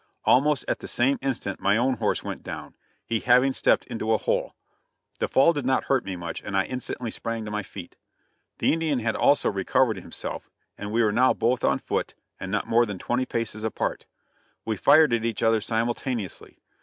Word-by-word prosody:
Almost 145 +2 +3
at - - -1
the - - -8
same 135 +3 +1
instant 130 -8 -2
my 100 +2 +2
own 125 +1 +1
horse 105 -1 0
went - - -5
down, - - -8 0.3
he 115 -1 -1
having 125 +3 +4
stepped - - +2
into 115 -2 -1
a - - +4
hole. - - -1 0.6
The - - 0
fall 140 +6 +4
did 145 -3 -3
not 130 +1 +1
hurt 135 -2 +1
me 95 -1 -4
much, 85 -2 -6
and 100 -1 -3
I 95 - +3
instantly 125 -2 -5
sprang 115 -1 -4
to 105 - -6
my 105 0 -1
feet. 85 - -10 0.6
The - - +2
Indian 160 -3 0
had 110 -2 -1
also 145 - +3
recovered 105 +3 +1
himself, 95 - -7 0.3
and 105 0 -6
we 115 +2 +2
were 105 - +3
now 125 +4 +3
both 120 +1 0
on - - +3
foot, - - -3 0.2
and 95 - -5
not 105 - 0
more 120 +1 +3
than 100 -2 -5
twenty 125 +7 -1
paces 110 -2 -3
apart. 110 - -3 0.6
We 110 - -1
fired 155 +6 +5
at 115 -1 +1
each 115 -2 -2
other 115 -1 +3
simultaneously. 115 -2 -3
115 Hz, 200 wpm, -25 LUFS, 105-130 Hz, 0.6 s, fired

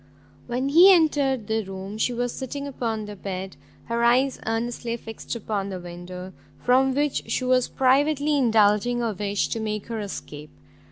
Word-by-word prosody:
When 250 +3 -1
he 350 +7 +8
entered 285 - +3
the 220 +1 -1
room, 195 +2 -7
she 250 - +1
was 245 0 -2
sitting 280 +2 -5
upon 230 -6 -3
the 210 0 -8
bed, 190 -1 -6 0.3
her 235 0 -1
eyes 255 +3 +3
earnestly 235 +1 -2
fixed 225 +1 -7
upon 205 -3 -3
the 185 -2 -5
window, 180 +1 -8 0.2
from 260 +1 +3
which 290 0 -1
she 255 - 0
was 255 -1 +3
privately 285 +3 +2
indulging 225 -1 +3
a 225 -2 -1
wish 200 +1 -1
to 225 - -2
make 215 -2 -3
her 230 -1 -3
escape. 150 -7 -7
235 Hz, 165 wpm, -24 LUFS, 205-260 Hz, 0.3 s, he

